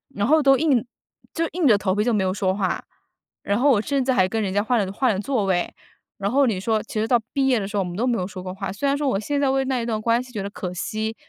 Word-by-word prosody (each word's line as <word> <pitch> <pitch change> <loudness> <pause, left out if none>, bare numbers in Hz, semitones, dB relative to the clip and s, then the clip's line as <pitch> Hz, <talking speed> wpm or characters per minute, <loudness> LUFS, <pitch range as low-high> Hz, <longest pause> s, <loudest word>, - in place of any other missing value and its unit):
然 205 - 0
后 315 +2 +5
都 270 0 +6
硬 270 -7 +2 0.5
就 330 0 0
硬 340 -4 +2
着 215 - +6
头 195 -1 -1
皮 210 - +1
就 240 +1 +1
没 205 -3 +1
有 185 - +1
说 190 -2 0
话， 190 -2 -2 0.6
然 200 +3 0
后 285 +3 +4
我 210 -4 +3
甚 275 0 -1
至 265 - +2
还 185 -6 +3
跟 225 +1 -1
人 190 - -2
家 205 +1 +1
换 240 +1 +1
了 190 - -6
换 255 +1 +2
了 190 - -3
座 225 -2 -1
位， 180 -2 0 0.5
然 200 +2 -1
后 275 +1 +4
你 200 -5 0
说 220 +1 0
其 215 -1 -3
实 220 - 0
到 240 -1 +4
毕 270 -1 +1
业 250 -4 +3
的 195 - -3
时 210 - -7
候， 195 - +2
我 - - -5
们 175 +2 -6
都 240 - 0
没 240 -2 +1
有 180 - -2
说 185 -2 -8
过 185 - -5
话。 190 0 -5
虽 275 +8 -2
然 280 - +2
说 290 -1 -1
我 195 - 0
现 285 +6 -2
在 275 - +2
为 270 0 +1
那 260 -2 -1
一 - - -3
段 220 -2 -1
关 230 +2 +2
系 255 - -15
觉 200 -3 -3
得 200 - -4
可 180 -3 -5
惜， 220 +4 -3
220 Hz, 345 characters per minute, -23 LUFS, 195-265 Hz, 0.6 s, 都